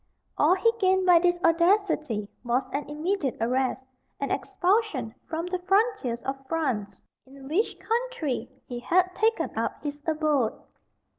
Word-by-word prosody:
All 365 - +4
he 390 +5 +3
gained 375 -1 +3
by 355 -2 +7
this 350 0 +2
audacity 330 - +2 0.2
was 245 +2 +1
an 285 0 -3
immediate 305 -1 -1
arrest, 255 +3 0 0.4
and 280 - -2
expulsion 355 - 0
from 330 +1 -3
the 360 0 -2
frontiers 385 - +1
of 270 0 -4
France, 240 - -2 0.2
in 270 0 -13
which 360 +10 0
country 455 - -2 0.2
he 245 -1 -6
had 365 +8 +2
taken 445 +4 0
up - - -1
his 290 0 -5
abode. 305 -7 +1
320 Hz, 140 wpm, -27 LUFS, 265-375 Hz, 0.4 s, by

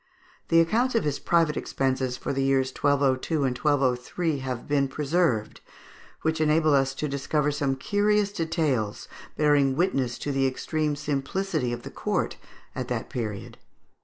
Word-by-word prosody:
The 165 - +5
accounts 235 +9 +1
of 230 - +2
his 145 -2 -1
private 165 -3 +2
expenses 130 -1 -1
for - - -3
the 135 - 0
years 135 -1 +2
1202 140 +1 +1
and 130 -2 0
1203 140 +3 0
have 130 -2 -5
been 140 -1 +2
preserved, 140 -5 0 0.6
which 160 0 0
enable 155 0 +3
us 135 -1 +2
to 150 - -2
discover 150 +1 0
some 140 -2 0
curious 205 +6 +1
details 160 - -1 0.3
bearing 145 -3 +3
witness 135 -8 0
to 145 - -3
the 135 -1 +2
extreme 150 +3 -1
simplicity 150 0 -2
of 120 0 -5
the - - -8
court - - -2 0.4
at - - -4
that - - -4
period. 110 -5 -5
145 Hz, 150 wpm, -26 LUFS, 130-160 Hz, 0.6 s, The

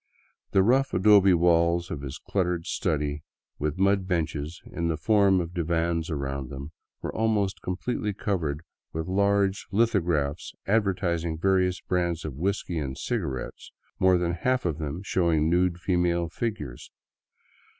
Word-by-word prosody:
The 95 - +4
rough 130 +6 +2
adobe 100 -1 +6
walls 85 +1 +3
of 80 -7 -4
his 70 -2 -6
cluttered 90 -3 -1
study, 75 -1 -1 0.4
with 75 +2 -2
mud 95 0 +2
benches 80 -3 -2
in 85 - -3
the 80 -2 0
form 100 +2 +4
of 85 0 -4
divans 85 -1 0
around 70 -3 -3
them, 70 +2 -7 0.3
were - - -3
almost 105 -3 0
completely 105 +3 -2
covered 85 -7 -2 0.3
with 80 0 -3
large 100 +1 +1
litho 115 +1 +3
graphs 80 -3 -2
advertising 90 -6 0
various 90 0 +1
brands 85 -3 -1
of 75 - -4
whiskey 90 +2 -2
and 65 -3 -4
cigarettes, 65 -2 -4 0.3
more 95 -1 +5
than 85 -1 0
half 125 +8 0
of 80 -3 -1
them 80 +4 -4
showing 85 -5 +1
nude 90 0 +2
female 90 -2 +1
figures. 85 - -5
85 Hz, 140 wpm, -27 LUFS, 80-95 Hz, 0.4 s, adobe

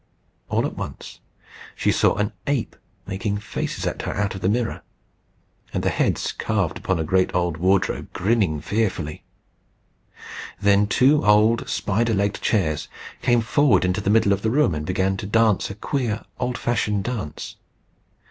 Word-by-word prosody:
All - - +1
at - - -4
once - - -7 0.6
she - - +1
saw - - +3
an 105 0 -1 0.2
ape 140 -5 -1 0.3
making 100 +1 -2
faces 105 - -4
at - - -2
her - - -4
out 100 -1 -1
of 95 - -7
the 95 - +2
mirror, 115 +2 -1 0.9
and - - -1
the - - +2
heads - - 0
carved - - -1
upon 95 - 0
a 80 - -1
great 95 +3 +1
old 85 -2 0
wardrobe 95 +3 +1
grinning 95 -7 +1
fearfully. 95 -8 -2 1.4
Then 100 0 +4
two 140 +7 +4
old 105 +2 +4
spider 115 +2 0
legged 100 +1 0
chairs 80 -9 0 0.3
came 120 -2 +3
forward 120 - +3
into 90 +3 0
the 100 - -1
middle 105 -2 +4
of 100 - -2
the 110 - 0
room, 130 - +3
and 75 0 -4
began 95 +1 0
to 100 - -5
dance 110 -1 +2
a 100 - -6
queer, 115 -1 -2
old 125 -1 -1
fashioned 105 -4 0
dance. 105 -10 -5
100 Hz, 160 wpm, -23 LUFS, 95-115 Hz, 1.4 s, Then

